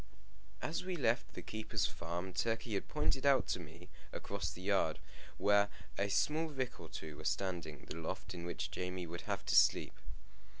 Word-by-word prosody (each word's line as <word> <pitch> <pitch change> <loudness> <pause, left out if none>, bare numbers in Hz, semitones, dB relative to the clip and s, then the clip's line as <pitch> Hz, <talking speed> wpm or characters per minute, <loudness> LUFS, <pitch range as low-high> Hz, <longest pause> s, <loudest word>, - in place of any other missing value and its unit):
As 160 +3 -1
we 185 0 -2
left 125 -5 +1
the - - -5
keeper's 110 -1 -1
farm, 90 +3 -3
Turkey 115 +1 0
had 100 - -1
pointed 80 - +1
out 140 -2 +6
to - - +1
me, 85 +1 -10 0.2
across 100 -6 -3
the 90 - -8
yard, 95 -5 +3 0.4
where 100 0 +5 0.3
a 100 - +1
small 155 +10 +2
rick 130 -5 -3
or 80 - -8
two 80 -2 -6
were 80 - -8
standing, 80 -2 -1
the 80 - -5
loft 95 +4 -4
in 85 -1 -5
which 85 -3 -3
Jamie 90 +2 -2
would 85 +1 -5
have - - -1
to - - +2
sleep. - - +6
95 Hz, 180 wpm, -37 LUFS, 85-115 Hz, 0.4 s, out